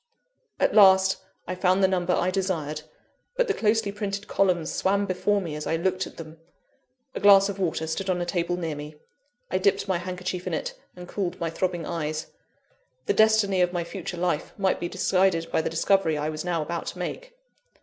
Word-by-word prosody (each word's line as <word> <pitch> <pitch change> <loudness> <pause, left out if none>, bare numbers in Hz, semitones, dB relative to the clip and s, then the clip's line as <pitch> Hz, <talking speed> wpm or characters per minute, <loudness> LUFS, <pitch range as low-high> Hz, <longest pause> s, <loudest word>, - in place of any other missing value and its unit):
At - - +2
last, 190 -2 +6 0.3
I 185 - -2
found 185 +1 +2
the - - +7
number 180 -1 0
I 180 +1 +1
desired; 165 -6 -2 0.6
but - - +2
the 410 - +2
closely 220 - +1
printed 200 0 -4
columns 180 -4 +1
swam 200 +1 +1
before 200 +2 +1
me 170 -6 -5
as 150 - -5
I 165 - +1
looked 185 +2 -1
at - - -14
them. 160 -1 -10 0.7
A - - -4
glass 200 -1 +7
of 200 0 -5
water 165 -3 -1
stood 175 +4 -3
on 180 -1 +1
a 175 - -1
table 175 0 -1
near 165 -3 -3
me 150 +1 -8 0.6
I 185 - +1
dipped 195 +1 +1
my 185 -3 0
handkerchief 180 0 -4
in - - -1
it, - - -4 0.2
and 180 0 -10
cooled 190 -3 -3
my 165 -1 -2
throbbing 175 -1 -2
eyes. 155 -2 -3 0.7
The - - +2
destiny 220 -3 +4
of 180 0 +2
my 175 -1 -1
future 180 0 -6
life 170 -3 -1
might 195 -2 +1
be 175 - -3
decided 185 -3 +1
by - - +2
the - - -2
discovery 165 -1 +2
I 150 +1 -1
was 155 0 -4
now 170 -3 -1
about 170 +2 -4
to - - -5
make! - - -6
180 Hz, 200 wpm, -26 LUFS, 165-195 Hz, 0.7 s, the